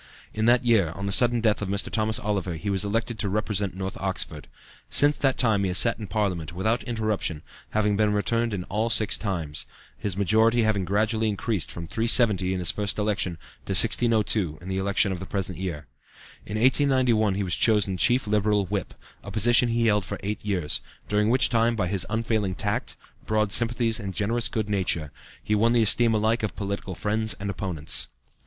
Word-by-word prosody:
In 110 0 -1
that 120 +1 +4
year, 105 -9 +3
on 100 - -5
the 100 - -2
sudden 120 +2 +3
death 110 -2 +1
of 100 - -3
Mr. 100 +1 -3
Thomas 110 0 0
Oliver, 95 -5 -2
he 100 +6 -4
was 95 0 +1
elected 115 +2 -2
to 100 - +1
represent 100 -2 -1
North 95 0 -5
Oxford. 95 -6 -3 0.4
Since 145 +1 +5
that 135 -2 +1
time 110 -5 +2
he - - +1
has 90 0 +2
sat 115 -1 +1
in 105 - -6
Parliament 90 -6 -2
without 110 +7 0
interruption, 110 - -2 0.3
having 105 -1 +1
been 105 0 +2
returned 115 +3 0
in 95 -3 -3
all 110 +5 -2
six 110 -2 +3
times, 85 -8 -3 0.3
his 100 -3 -3
majority 110 +4 +3
having 105 -3 0
gradually 110 +3 0
increased 105 -2 -2
from 85 - -7
370 110 -3 +2
in 95 - -1
his 90 -2 +2
first 105 -1 -3
election 105 -4 -1 0.3
to - - -1
1602 110 -8 +3
in 90 - -10
the 95 0 -2
election 100 0 +1
of 90 - -4
the 95 - -8
present 95 -3 -3
year. 85 -6 -5 0.6
In 105 - -4
1891 125 -5 +2
he 100 - -1
was 90 -3 -1
chosen 105 -4 +2
chief 120 +7 +2
Liberal 105 -1 +1
Whip, 95 -1 -4 0.3
a - - -8
position 120 +3 +3
he 115 0 +1
held 105 -2 +2
for - - -6
eight 105 +2 -4
years, 95 -7 -2 0.3
during 105 +1 +1
which 130 +3 +4
time 115 0 +1
by 100 - -1
his 95 0 +1
unfailing 110 -3 -1
tact, - - -3 0.3
broad 110 -1 +1
sympathies 115 0 +1
and 100 -3 -6
generous 115 +1 0
good 110 +2 -3
nature, 90 -7 -2 0.3
he 105 - -1
won 115 +3 +3
the 120 -2 +3
esteem 115 +1 +4
alike 110 +2 +1
of 110 - -3
political 100 -2 -5
friends 110 +3 0
and 100 0 -3
opponents. 90 -6 -1
105 Hz, 195 wpm, -25 LUFS, 95-115 Hz, 0.6 s, Since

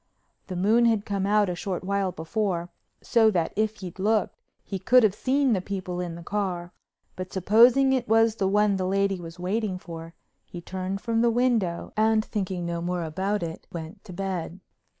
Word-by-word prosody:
The 185 - -5
moon 215 +6 +3
had 220 -3 +2
come 200 -2 -1
out 210 0 +3
a 180 - -1
short 180 +1 -4
while 195 0 0
before, 175 +1 -2 0.3
so 225 -2 +4
that 175 -6 0
if 215 0 -1
he'd 185 0 -8
looked 210 +1 +1 0.3
he 195 - -5
could 250 +5 +5
have 210 -3 +4
seen 265 +3 +1
the 190 - 0
people 185 -2 -4
in 175 -2 -4
the 170 - -9
car, 180 -3 -3 0.4
but 185 0 -6
supposing 235 +8 +5
it 255 -2 0
was 225 0 +3
the 195 - +1
one 205 0 +3
the 185 -1 -1
lady 195 0 +1
was 165 0 -9
waiting 190 +2 -1
for, 165 -2 -9 0.3
he 175 - -9
turned 190 +2 -4
from 230 -1 0
the 235 - +4
window, 230 -7 0
and, 220 0 +3
thinking 190 -4 -3
no 170 0 -3
more 175 0 -2
about 190 +5 -2
it, 165 -1 -6
went 170 +4 -8
to 195 - -10
bed. 185 -1 -4
195 Hz, 190 wpm, -26 LUFS, 180-220 Hz, 0.4 s, could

